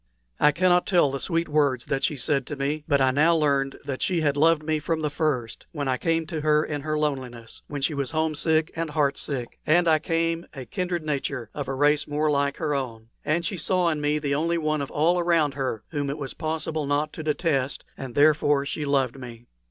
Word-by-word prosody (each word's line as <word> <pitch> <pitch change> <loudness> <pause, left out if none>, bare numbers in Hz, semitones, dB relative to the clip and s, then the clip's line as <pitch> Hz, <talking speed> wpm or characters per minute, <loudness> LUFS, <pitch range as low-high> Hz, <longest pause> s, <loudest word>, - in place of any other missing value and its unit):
I 150 - +6
cannot 180 +2 +3
tell 175 -8 +3
the 140 - -3
sweet 165 +3 0
words 145 -5 +1
that 135 -1 -2
she 150 - +1
said 140 -1 0
to 150 - -4
me; 145 +2 -2
but 140 -3 +3
I 130 -1 +4
now 155 +5 +4
learned 140 -3 +1
that 135 -2 -4
she 180 -3 +1
had 145 -2 +1
loved 160 +1 +3
me 155 0 0
from 160 +1 -2
the 150 - 0
first 140 -7 -2
when 145 -3 -3
I 130 -1 +1
came 165 -1 0
to 160 -2 -4
her 150 0 +3
in 145 -2 -4
her 155 +1 -2
loneliness, 130 -6 -3
when 145 -2 -5
she 155 - +1
was 140 -2 -2
homesick 155 0 +1
and 165 -1 -2
heartsick; 140 -4 -2
and 170 +3 +3
I 155 -1 +5
came, 165 +1 -1
a 130 -2 -7
kindred 175 +6 -3
nature, 135 -6 -3
of 145 -3 -4
a 135 - -2
race 145 +2 +2
more 150 +1 0
like 140 0 0
her 155 -3 -1
own; 115 -5 -4
and 170 +3 0
she 200 - -2
saw 180 +2 +2
in 155 -2 -2
me 150 +1 +1
the 145 -2 -1
only 165 +4 +1
one 155 -2 0
of 140 - -4
all 170 +4 +2
around 165 -4 +2
her 130 -6 -3
whom 145 -3 -2
it 140 - -3
was 140 -3 -5
possible 155 -1 -3
not 145 +2 0
to - - -6
detest, 150 -3 -1
and 130 -3 -8
therefore 145 -1 +4
she 145 +1 -3
loved 135 -2 0
me. 120 -2 -10
150 Hz, 225 wpm, -25 LUFS, 140-160 Hz, -, I